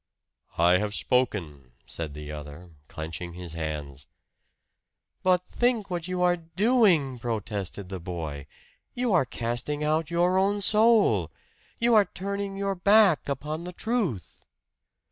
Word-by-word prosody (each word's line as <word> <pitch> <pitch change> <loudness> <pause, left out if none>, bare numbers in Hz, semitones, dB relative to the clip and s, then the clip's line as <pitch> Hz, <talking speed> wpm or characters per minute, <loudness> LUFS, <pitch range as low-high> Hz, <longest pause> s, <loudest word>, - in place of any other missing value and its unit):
"I 90 +2 +5
have 105 0 -2
spoken," 85 - -1
said 80 -3 -6
the 75 0 -7
other, 75 +4 -9 0.2
clenching 80 +2 -6
his 90 -2 -8
hands. 75 -4 -5 1.1
"But 180 -1 +2
think 240 -5 0
what 175 -1 -3
you 180 -1 -1
are 175 0 +3
doing!" 170 - +2
protested 105 -4 -4
the 95 -1 -5
boy. 80 -5 -6 0.5
"You 245 -3 0
are 170 -7 +4
casting 120 +5 -3
out 155 0 0
your 175 +2 +2
own 200 +1 +1
soul! 220 +1 +4 0.5
You 235 0 +3
are 210 -2 +6
turning 200 +1 -4
your 195 0 -1
back 200 -4 +4
upon 150 +4 -3
the 180 +1 -7
truth!" 205 - -2
150 Hz, 130 wpm, -27 LUFS, -, 1.1 s, are